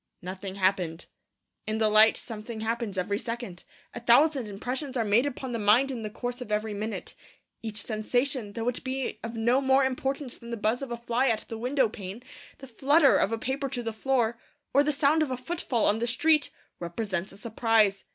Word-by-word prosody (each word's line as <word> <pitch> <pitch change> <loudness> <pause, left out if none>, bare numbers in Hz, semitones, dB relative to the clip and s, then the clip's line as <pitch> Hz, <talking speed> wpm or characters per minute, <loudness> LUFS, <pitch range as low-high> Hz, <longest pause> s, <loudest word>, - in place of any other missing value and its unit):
Nothing 185 +1 -6
happened. 185 -4 0 0.6
In 215 0 -1
the 220 -1 +3
light 215 +1 +6
something 220 0 -7
happens 225 -3 -2
every 200 +3 -1
second. 230 -7 -6 0.3
A - - -5
thousand 255 +2 +4
impressions 255 +7 -4
are 230 - +1
made 220 +6 +3
upon 260 -2 -5
the 230 - -2
mind 225 +7 +4
in 245 -3 -4
the 215 - -4
course 245 +3 -5
of 215 - -7
every 210 0 0
minute. 215 +2 -4 0.5
Each 215 -2 -4
sensation, 245 +1 -1
though 230 +1 -3
it 245 - -2
be 260 -4 -3
of 230 +1 -5
no 240 +4 +2
more 265 0 +4
importance 265 0 -3
than 235 - -11
the 235 - -3
buzz 220 +4 0
of 275 - -5
a 235 - -3
fly 240 +3 0
at 225 -3 0
the 225 - -4
window 255 +1 +2
pane, 205 +2 -8 0.3
the 270 - -10
flutter 275 +4 +4
of 200 - +2
a 225 - 0
paper 265 +4 -2
to 250 -2 -4
the 225 -1 -3
floor, 235 -1 0 0.3
or 280 - +6
the 300 - +1
sound 290 +2 +3
of 310 - +1
a 255 - -2
footfall 255 -4 -1
on 210 +2 +2
the 235 - 0
street, 300 +5 +3 0.3
represents 185 +1 -3
a 195 - -14
surprise. 220 -2 +2
235 Hz, 205 wpm, -28 LUFS, 215-260 Hz, 0.6 s, light